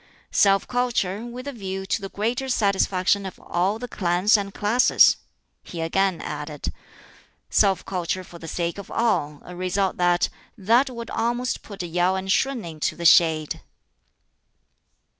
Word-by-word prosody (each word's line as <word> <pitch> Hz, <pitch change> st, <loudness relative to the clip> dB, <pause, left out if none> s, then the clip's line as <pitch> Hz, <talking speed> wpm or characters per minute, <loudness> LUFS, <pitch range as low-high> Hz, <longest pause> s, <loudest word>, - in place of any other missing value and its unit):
"Self 195 Hz, -1 st, +3 dB
culture 235 Hz, -5 st, -1 dB
with 250 Hz, +3 st, -8 dB
a -, -, -2 dB
view 195 Hz, -4 st, -5 dB
to 200 Hz, -, -1 dB
the 195 Hz, -, -5 dB
greater 235 Hz, +7 st, -2 dB
satisfaction 200 Hz, -3 st, +2 dB
of 190 Hz, -, -8 dB
all 185 Hz, +5 st, -1 dB
the 245 Hz, +2 st, -6 dB
clans 185 Hz, +1 st, +2 dB
and 200 Hz, -1 st, -1 dB
classes," 220 Hz, +6 st, +4 dB, 0.4 s
he 170 Hz, -, -9 dB
again 185 Hz, +2 st, 0 dB
added. 150 Hz, 0 st, -5 dB, 0.8 s
"Self 190 Hz, -3 st, +3 dB
culture 185 Hz, 0 st, -2 dB
for 175 Hz, -1 st, -13 dB
the 165 Hz, -, -9 dB
sake 170 Hz, +3 st, -3 dB
of 200 Hz, -, -9 dB
all 150 Hz, -11 st, 0 dB
a 180 Hz, -, -9 dB
result 185 Hz, +2 st, -1 dB
that, 175 Hz, 0 st, +2 dB, 0.3 s
that 235 Hz, +7 st, +3 dB
would 235 Hz, -2 st, -7 dB
almost 240 Hz, +2 st, -1 dB
put 200 Hz, -3 st, -8 dB
Yau 175 Hz, +2 st, +1 dB
and 190 Hz, 0 st, -2 dB
Shun 265 Hz, -2 st, +1 dB
into 155 Hz, -2 st, -3 dB
the 170 Hz, -, -6 dB
shade!" 160 Hz, -2 st, +4 dB
195 Hz, 150 wpm, -24 LUFS, 175-225 Hz, 0.8 s, classes